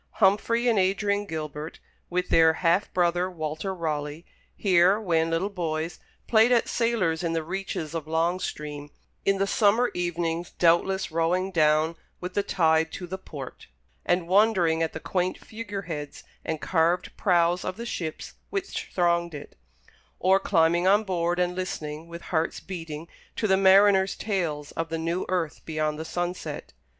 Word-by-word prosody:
Humfrey 225 +4 +2
and 225 -4 +3
Adrian 200 +2 +1
Gilbert, 155 -1 -5 0.3
with 180 0 -1
their 160 -1 +5
half 175 +5 +3
brother, 175 0 +1
Walter 160 +2 -4
Raleigh, 155 -2 -3 0.3
here, 185 +1 +4
when 165 -6 +1
little 165 +4 0
boys, 160 -3 -3 0.3
played 225 +1 +4
at 240 -2 +3
sailors 220 -9 0
in 170 -2 -1
the 165 -1 -1
reaches 170 -3 -4
of 160 -2 -4
Long 165 +3 +1
Stream, 150 -3 -5 0.4
in 195 0 +3
the 195 - +1
summer 215 +4 +3
evenings 175 -1 -2
doubtless 175 +3 +2
rowing 175 +4 0
down 155 -1 +3 0.2
with 180 0 -6
the 205 - +2
tide 160 -4 +2
to 180 - -5
the 190 +2 -6
port, 140 -8 -9 0.4
and 175 -1 +1
wondering 185 -4 +3
at 165 - 0
the - - -5
quaint 180 +2 -1
figure 205 -3 -7
heads 150 -4 -6 0.2
and 160 -1 -3
carved 170 +2 +1
prows 175 -1 +2
of 185 - -4
the 235 - -5
ships 165 -9 -5 0.2
which 390 -1 -4
thronged 170 -2 +1
it; 145 - -10 0.6
or 190 +1 +4
climbing 170 0 +2
on 205 +3 +5
board, 175 -3 -1
and 180 0 +1
listening, 160 -4 -5
with 170 0 -9
hearts 160 0 0
beating, 165 -4 -7 0.3
to - - -1
the 190 -2 +4
mariners' 195 0 +5
tales 165 -9 -2
of 165 0 -3
the 165 - -2
new 165 +3 -2
earth 175 -4 -1
beyond 155 -1 -2
the 160 - -5
sunset. 175 +2 -4
175 Hz, 160 wpm, -26 LUFS, 160-190 Hz, 0.6 s, their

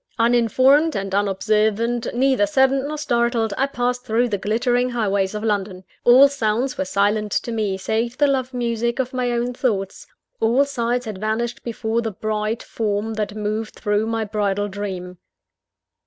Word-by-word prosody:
Uninformed 255 +6 +3
and 195 -1 -3
unobservant, 215 +4 +1
neither 265 +4 +2
saddened 270 -1 +2
nor 305 +1 -4
startled, 235 -5 0
I 270 - +1
passed 250 -2 -2
through 240 +1 +1
the 205 -3 -2
glittering 245 +5 +1
highways 200 -4 0
of 210 - -4
London. 200 -3 -2 0.2
All 255 +3 +8
sounds 250 -1 -1
were - - -2
silent 205 +2 0
to 235 - -1
me 210 -4 -1
save 225 +5 -2
the 290 - +4
love 265 -2 0
music 235 -1 -1
of 260 -1 -2
my 250 -1 -1
own 240 +1 -1
thoughts; 200 -7 -2 0.3
all 240 +5 +3
sights 245 -2 -2
had 215 -4 -6
vanished 220 +3 -2
before 230 0 -2
the 225 - -2
bright 215 +2 -3
form 215 0 -2
that 210 -1 -3
moved 215 +1 -3
through 210 +1 0
my 225 -1 -1
bridal 205 -1 -1
dream. 185 -3 -6
225 Hz, 160 wpm, -21 LUFS, 210-245 Hz, 0.3 s, All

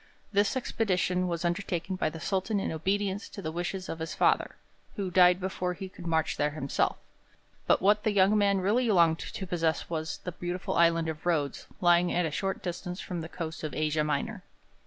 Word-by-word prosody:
This 205 +5 +2
expedition 185 -7 0
was 170 0 -2
undertaken 175 +1 -1
by 185 - 0
the 160 - -8
Sultan 195 +4 0
in - - -2
obedience 195 +5 -1
to - - -9
the 160 -5 -3
wishes 175 +3 -3
of 165 - -5
his 160 +1 -4
father, - - +2 0.4
who 195 -4 -3
died 180 0 +6
before 180 -1 -2
he 190 +1 -7
could 180 -2 -9
march 160 -1 +1
there 145 - +2
himself; 145 -2 -1 0.7
but - - +3
what 210 +2 +4
the 215 - +2
young 200 +1 +4
man 200 -2 +3
really 225 +6 +2
longed 170 -5 +4
to 190 - -6
possess 165 -2 -1
was 160 -1 -2
the 180 - -3
beautiful 175 +1 -4
Island 165 -1 +3
of 160 +1 -5
Rhodes 150 -5 0
lying 175 0 +4
at 175 0 +1
a 160 - -2
short 195 +5 -2
distance 180 +1 -4
from 175 -3 -4
the 160 - -7
coast 160 -2 -6
of 155 - -4
Asia 155 0 +1
Minor. 205 +6 -2
180 Hz, 200 wpm, -29 LUFS, 165-195 Hz, 0.7 s, died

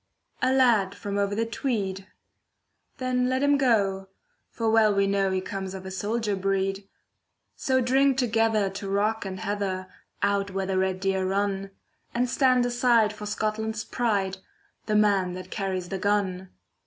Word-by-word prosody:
A 255 - +3
lad 235 -7 +3
from 200 0 -3
over 200 0 0
the 225 +2 0
Tweed. 205 -6 -3 0.9
Then 250 -1 0
let 260 +1 0
him 285 0 +4
go, 200 -8 +1 0.4
for 230 - -3
well 220 -1 +5
we 200 0 +3
know 195 0 +1
He 190 0 0
comes 190 0 -5
of 190 0 -8
a 190 - -6
soldier 210 +2 -1
breed. 195 0 -1 0.7
So 260 -1 +1
drink 265 +2 +3
together 225 -4 +2
to 195 0 -6
rock 210 +2 0
and 190 0 -5
heather, 195 -3 -3 0.3
Out 200 0 +1
where 195 0 -2
the 190 0 0
red 190 0 -1
deer 190 -1 0
run, 195 0 -1 0.5
And 245 +1 +2
stand 255 -1 +3
aside 240 -3 +3
for 210 0 -7
Scotland's 215 +1 -2
pride— 200 -6 -1 0.5
The 215 - +1
man 200 -4 +3
that 185 0 -8
carries 185 -3 -3
the 195 - -3
gun! 190 -2 0
205 Hz, 160 wpm, -26 LUFS, 195-230 Hz, 0.9 s, well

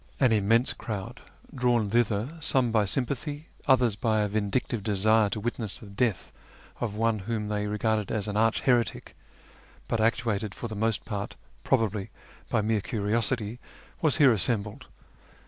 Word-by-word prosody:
An 130 -4 +4
immense 115 +3 +3
crowd, 100 -4 -6 0.3
drawn 120 -5 +1
thither 115 +1 +1
some 130 -5 +2
by 110 -2 +3
sympatliy, 140 - -1 0.2
others 125 -5 +4
by 110 0 +1
a 105 - +1
vindictive 105 +2 -1
desire 105 +1 +3
to 110 +1 -3
witness 110 -2 -3
the - - -10
death 100 +1 -1 0.5
of 110 -4 -3
one 115 0 +1
whom 105 +1 -3
they 105 0 -1
regarded 105 0 0
as 110 -3 -2
an 105 - -3
arch 115 +1 +2
heretic, 120 -6 +1 0.7
but 115 - 0
actuated 110 -3 0
for 120 - -5
the 110 - -6
most 110 +1 -1
part, 100 -3 -4 0.3
probably, 110 -6 0 0.4
by 110 - +2
mere 110 -1 +1
curiosity, 110 +2 -1 0.4
was 155 -4 +3
here 135 -5 +6
assembled. 105 +1 -1
110 Hz, 150 wpm, -27 LUFS, 105-120 Hz, 0.7 s, here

